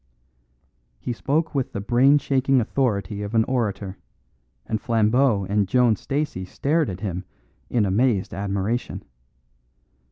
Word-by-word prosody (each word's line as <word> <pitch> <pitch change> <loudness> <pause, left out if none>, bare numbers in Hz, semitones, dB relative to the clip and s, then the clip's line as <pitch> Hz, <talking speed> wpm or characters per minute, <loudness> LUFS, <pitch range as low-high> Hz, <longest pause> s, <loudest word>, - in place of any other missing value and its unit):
He 120 - -3
spoke 155 +7 -1
with 135 -3 -2
the - - -3
brain 125 +7 +4
shaking 135 -1 +2
authority 105 -5 -1
of 105 +2 -4
an 110 - +5
orator, 105 -6 -2 0.7
and 110 -1 -2
Flambeau 115 -1 +2
and 100 0 +1
Joan 120 +1 +3
Stacey 140 -5 -3
stared 150 - 0
at 95 0 -6
him 95 -3 -3 0.5
in 115 -4 +2
amazed 100 +1 +1
admiration. 100 +4 -2
115 Hz, 125 wpm, -23 LUFS, 100-130 Hz, 0.7 s, an